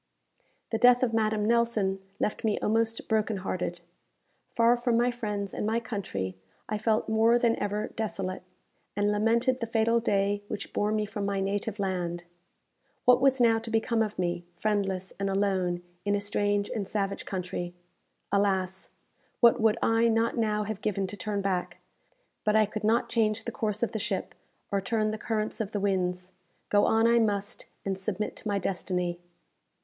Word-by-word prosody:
The 225 Hz, -, 0 dB
death 245 Hz, +1 st, +6 dB
of 235 Hz, -3 st, +1 dB
Madame 215 Hz, -1 st, +1 dB
Nelson 225 Hz, -4 st, +2 dB, 0.2 s
left 210 Hz, -, -1 dB
me 215 Hz, -2 st, +1 dB
almost 225 Hz, +1 st, 0 dB
broken 220 Hz, -1 st, +1 dB
hearted. 180 Hz, -2 st, -3 dB, 0.7 s
Far 235 Hz, +1 st, +5 dB
from 240 Hz, -1 st, +1 dB
my 240 Hz, +1 st, +3 dB
friends 210 Hz, -4 st, -4 dB
and -, -, -3 dB
my 220 Hz, +2 st, +1 dB
country, 140 Hz, -, -4 dB, 0.3 s
I 215 Hz, 0 st, -2 dB
felt 220 Hz, 0 st, +1 dB
more 225 Hz, +2 st, +4 dB
than 235 Hz, -1 st, +2 dB
ever 205 Hz, +1 st, -2 dB
desolate, 195 Hz, -4 st, -3 dB, 0.5 s
and 205 Hz, +1 st, +2 dB
lamented 235 Hz, +5 st, +2 dB
the 230 Hz, -, -2 dB
fatal 230 Hz, +1 st, +2 dB
day 200 Hz, -2 st, +1 dB
which 205 Hz, -1 st, -6 dB
bore 210 Hz, +1 st, +1 dB
me 215 Hz, -1 st, +1 dB
from 205 Hz, 0 st, -5 dB
my 200 Hz, -1 st, -1 dB
native 200 Hz, +2 st, -2 dB
land. 180 Hz, -3 st, -2 dB, 0.8 s
What 250 Hz, +1 st, +6 dB
was 270 Hz, -1 st, +4 dB
now 230 Hz, -2 st, +5 dB
to 225 Hz, -, -7 dB
become 225 Hz, +1 st, +1 dB
of 215 Hz, -1 st, -1 dB
me, 175 Hz, -1 st, -1 dB
friendless 195 Hz, -1 st, -1 dB
and 195 Hz, 0 st, 0 dB
alone, 190 Hz, -3 st, 0 dB, 0.2 s
in 205 Hz, 0 st, +1 dB
a -, -, +1 dB
strange 205 Hz, 0 st, 0 dB
and 200 Hz, -4 st, -3 dB
savage 200 Hz, -2 st, -2 dB
country? 180 Hz, -2 st, -4 dB, 0.6 s
Alas! 190 Hz, -2 st, 0 dB, 0.5 s
what 235 Hz, 0 st, +5 dB
would 220 Hz, 0 st, +4 dB
I 225 Hz, +1 st, +4 dB
not 225 Hz, 0 st, +2 dB
now 215 Hz, -2 st, +1 dB
have 215 Hz, 0 st, -5 dB
given 195 Hz, -2 st, 0 dB
to 190 Hz, -, -5 dB
turn 205 Hz, -1 st, -3 dB
back; 185 Hz, -2 st, -1 dB, 0.7 s
but 210 Hz, 0 st, +2 dB
I 215 Hz, 0 st, +6 dB
could 215 Hz, +1 st, -6 dB
not 225 Hz, +3 st, +2 dB
change 220 Hz, -1 st, +1 dB
the -, -, -3 dB
course 215 Hz, 0 st, -2 dB
of 235 Hz, -, 0 dB
the 220 Hz, -, -3 dB
ship, -, -, -2 dB, 0.4 s
or 200 Hz, -1 st, +1 dB
turn 215 Hz, +1 st, 0 dB
the 215 Hz, -, -5 dB
currents 215 Hz, 0 st, -2 dB
of 215 Hz, -1 st, -4 dB
the 205 Hz, -, 0 dB
winds. 180 Hz, -2 st, -1 dB, 0.4 s
Go 205 Hz, 0 st, +4 dB
on 225 Hz, 0 st, +3 dB
I 235 Hz, 0 st, +5 dB
must, 205 Hz, -2 st, -1 dB, 0.2 s
and 195 Hz, -1 st, 0 dB
submit 210 Hz, +1 st, -3 dB
to -, -, -6 dB
my 205 Hz, -1 st, +1 dB
destiny. 180 Hz, -2 st, -2 dB
210 Hz, 175 wpm, -28 LUFS, 195-225 Hz, 0.8 s, death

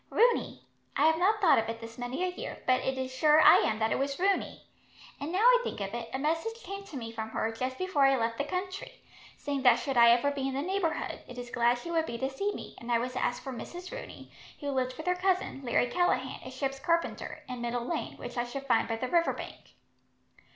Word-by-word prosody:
"Rooney. 480 Hz, +1 st, +2 dB, 0.3 s
I 290 Hz, -, +4 dB
have 320 Hz, 0 st, +4 dB
not 415 Hz, +4 st, +3 dB
thought 335 Hz, -, +6 dB
of 225 Hz, 0 st, -2 dB
it 230 Hz, 0 st, -4 dB
this 230 Hz, +1 st, -10 dB
many 245 Hz, +8 st, -3 dB
a 370 Hz, -, +1 dB
year, -, -, -7 dB
but 255 Hz, 0 st, +3 dB
it 265 Hz, 0 st, -1 dB
is 260 Hz, 0 st, -3 dB
sure 300 Hz, +4 st, +5 dB
I -, -, +9 dB
am 215 Hz, -, +1 dB
that 220 Hz, 0 st, 0 dB
it -, -, +1 dB
was 275 Hz, 0 st, -1 dB
Rooney; 390 Hz, +2 st, 0 dB, 0.6 s
and 290 Hz, +3 st, -4 dB
now 380 Hz, +4 st, +1 dB
I -, -, +7 dB
think -, -, -4 dB
of 195 Hz, +1 st, -4 dB
it, 235 Hz, -1 st, -5 dB
a -, -, -2 dB
message 330 Hz, -, -2 dB
came 395 Hz, +2 st, -6 dB
to 315 Hz, -8 st, -8 dB
me 230 Hz, -2 st, -6 dB
from 220 Hz, -1 st, -5 dB
her, 220 Hz, 0 st, -1 dB
just 255 Hz, +3 st, -3 dB
before 370 Hz, -6 st, -1 dB
I 270 Hz, 0 st, +4 dB
left 230 Hz, -1 st, -1 dB
the -, -, +2 dB
country, 370 Hz, +8 st, -4 dB, 0.4 s
saying 285 Hz, -2 st, -3 dB
that 250 Hz, -2 st, +7 dB
should 270 Hz, -3 st, -3 dB
I 235 Hz, 0 st, +8 dB
ever 245 Hz, +4 st, +4 dB
be 275 Hz, -1 st, -2 dB
in 270 Hz, -, -3 dB
the 275 Hz, -, -1 dB
neighbourhood, 370 Hz, -2 st, -1 dB
it 250 Hz, -, -10 dB
is 245 Hz, -1 st, -7 dB
glad 240 Hz, 0 st, +3 dB
she 340 Hz, +8 st, -7 dB
would 325 Hz, -1 st, +1 dB
be 235 Hz, -, -4 dB
to 265 Hz, +3 st, -2 dB
see 400 Hz, +10 st, -1 dB
me; -, -, -8 dB
and 240 Hz, 0 st, -6 dB
I 235 Hz, -, +4 dB
was 250 Hz, +2 st, -3 dB
to 255 Hz, -, -2 dB
ask 245 Hz, -, -1 dB
for 265 Hz, -, -5 dB
Mrs. 350 Hz, -, -8 dB
Rooney, -, -, -9 dB, 0.3 s
who 285 Hz, -2 st, -3 dB
lived 255 Hz, -1 st, -1 dB
with 315 Hz, -, -7 dB
her 360 Hz, -, +3 dB
cousin, 365 Hz, -6 st, 0 dB
Larry 245 Hz, 0 st, +2 dB
Callaghan, 265 Hz, -2 st, 0 dB
a -, -, -7 dB
ship's 270 Hz, +1 st, -3 dB
carpenter, 335 Hz, 0 st, -1 dB
in 250 Hz, -1 st, -6 dB
Middle 240 Hz, 0 st, -2 dB
Lane, -, -, -3 dB
which 245 Hz, -, -8 dB
I -, -, +2 dB
should 270 Hz, +3 st, -6 dB
find 235 Hz, -4 st, +2 dB
by 225 Hz, -, -1 dB
the 255 Hz, +3 st, -3 dB
river 335 Hz, +4 st, +2 dB
bank." -, -, -10 dB
270 Hz, 255 wpm, -30 LUFS, 245-340 Hz, 0.6 s, I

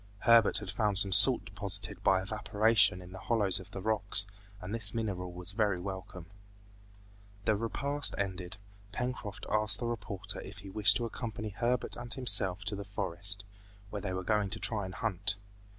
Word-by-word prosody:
Herbert 115 Hz, -2 st, +4 dB
had 105 Hz, -3 st, -6 dB
found 105 Hz, -1 st, -1 dB
some 100 Hz, +1 st, +5 dB
salt 120 Hz, +7 st, +9 dB
deposited 100 Hz, 0 st, -4 dB
by 95 Hz, -1 st, +2 dB
evaporation 105 Hz, -2 st, +1 dB
in 90 Hz, -, -14 dB
the 95 Hz, -, -10 dB
hollows 100 Hz, -4 st, -1 dB
of 95 Hz, 0 st, -13 dB
the 95 Hz, -2 st, -9 dB
rocks, 110 Hz, -2 st, 0 dB, 0.3 s
and 95 Hz, +2 st, -8 dB
this 110 Hz, -1 st, -2 dB
mineral 95 Hz, -5 st, -4 dB
was 90 Hz, +1 st, -2 dB
very 100 Hz, -3 st, -1 dB
welcome. 95 Hz, -2 st, -8 dB, 1.2 s
The 110 Hz, -, +2 dB
repast 140 Hz, +7 st, +1 dB
ended, 95 Hz, -3 st, -5 dB, 0.3 s
Pencroft 105 Hz, -4 st, -6 dB
asked 105 Hz, 0 st, 0 dB
the 120 Hz, -, -6 dB
reporter 100 Hz, -4 st, -6 dB
if 95 Hz, +1 st, -11 dB
he 100 Hz, -1 st, -11 dB
wished 105 Hz, 0 st, +6 dB
to 120 Hz, -, -4 dB
accompany 115 Hz, -1 st, -6 dB
Herbert 120 Hz, +4 st, -2 dB
and 120 Hz, 0 st, -9 dB
himself 100 Hz, -7 st, +4 dB
to 105 Hz, 0 st, -2 dB
the 100 Hz, -, -7 dB
forest, 100 Hz, 0 st, 0 dB, 0.5 s
where 105 Hz, -, -5 dB
they 95 Hz, -, -5 dB
were 95 Hz, 0 st, -4 dB
going 105 Hz, 0 st, 0 dB
to 110 Hz, -, -3 dB
try 110 Hz, -4 st, 0 dB
to 95 Hz, -, -10 dB
hunt. 105 Hz, -2 st, -2 dB
100 Hz, 175 wpm, -30 LUFS, 95-110 Hz, 1.2 s, salt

